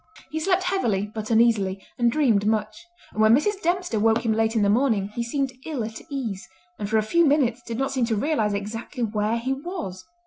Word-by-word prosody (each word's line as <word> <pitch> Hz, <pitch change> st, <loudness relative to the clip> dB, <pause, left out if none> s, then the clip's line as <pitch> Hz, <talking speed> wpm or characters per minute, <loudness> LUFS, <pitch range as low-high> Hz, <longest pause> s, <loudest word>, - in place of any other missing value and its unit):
He 315 Hz, -, -2 dB
slept 370 Hz, +3 st, +1 dB
heavily 225 Hz, -, 0 dB
but 215 Hz, -1 st, -5 dB
uneasily, 220 Hz, -4 st, +3 dB, 0.2 s
and 240 Hz, -1 st, +3 dB
dreamed 230 Hz, -8 st, +2 dB
much; 215 Hz, -, -1 dB, 0.3 s
and 215 Hz, -, -1 dB
when 220 Hz, +1 st, +7 dB
Mrs. 400 Hz, +8 st, 0 dB
Dempster 350 Hz, -, 0 dB
woke 225 Hz, +2 st, +2 dB
him 225 Hz, -, +2 dB
late 225 Hz, +1 st, +1 dB
in 220 Hz, -, +3 dB
the -, -, +3 dB
morning 220 Hz, -4 st, +2 dB
he 225 Hz, +3 st, -4 dB
seemed 270 Hz, +3 st, -1 dB
ill 295 Hz, -7 st, -3 dB
at 220 Hz, 0 st, -6 dB
ease, 235 Hz, -9 st, -4 dB, 0.3 s
and 205 Hz, -, -3 dB
for 220 Hz, -, +2 dB
a 215 Hz, -, +2 dB
few 340 Hz, +11 st, +3 dB
minutes 275 Hz, -6 st, +2 dB
did 230 Hz, -1 st, -6 dB
not 270 Hz, +2 st, -1 dB
seem 260 Hz, -3 st, +1 dB
to 230 Hz, -1 st, 0 dB
realise 215 Hz, -3 st, 0 dB
exactly 225 Hz, +5 st, -4 dB
where 215 Hz, +1 st, 0 dB
he 255 Hz, +3 st, -1 dB
was. 270 Hz, -, -6 dB
230 Hz, 215 wpm, -24 LUFS, 215-280 Hz, 0.3 s, when